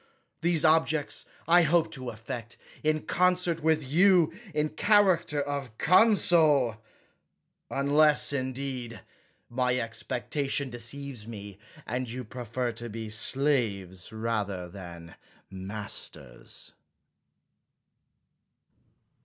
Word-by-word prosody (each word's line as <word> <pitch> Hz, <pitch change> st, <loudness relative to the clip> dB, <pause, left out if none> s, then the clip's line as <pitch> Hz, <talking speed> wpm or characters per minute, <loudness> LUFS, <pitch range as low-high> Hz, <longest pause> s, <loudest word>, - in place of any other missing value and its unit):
These 165 Hz, -2 st, +1 dB
objects 155 Hz, -1 st, +2 dB, 0.2 s
I 175 Hz, +1 st, +6 dB
hope 165 Hz, 0 st, +2 dB
to 130 Hz, -5 st, -5 dB
effect, 115 Hz, +1 st, -7 dB, 0.2 s
in 155 Hz, 0 st, 0 dB
concert 180 Hz, -2 st, +1 dB
with 155 Hz, 0 st, +2 dB
you, 175 Hz, +2 st, +4 dB, 0.2 s
in 150 Hz, -1 st, 0 dB
lie -, -, -21 dB
character 190 Hz, -8 st, +3 dB
of 140 Hz, -5 st, -4 dB
consul 160 Hz, -, +4 dB, 0.5 s
— -, -, -52 dB
^unless, 145 Hz, +2 st, +3 dB
indeed, 130 Hz, -3 st, -4 dB, 0.5 s
my 125 Hz, 0 st, 0 dB
expectation 135 Hz, +4 st, -2 dB
deceives 120 Hz, 0 st, -5 dB
me, 100 Hz, -3 st, -9 dB, 0.3 s
and 125 Hz, +1 st, -3 dB
you 125 Hz, +2 st, -5 dB
prefer 120 Hz, +1 st, -4 dB
to 115 Hz, +1 st, -7 dB
be 110 Hz, 0 st, -6 dB
slaves 110 Hz, -7 st, -1 dB
rather 105 Hz, -5 st, -3 dB
than 85 Hz, -2 st, -10 dB, 0.4 s
masters. 95 Hz, -, -8 dB
130 Hz, 95 wpm, -28 LUFS, 110-155 Hz, 0.5 s, I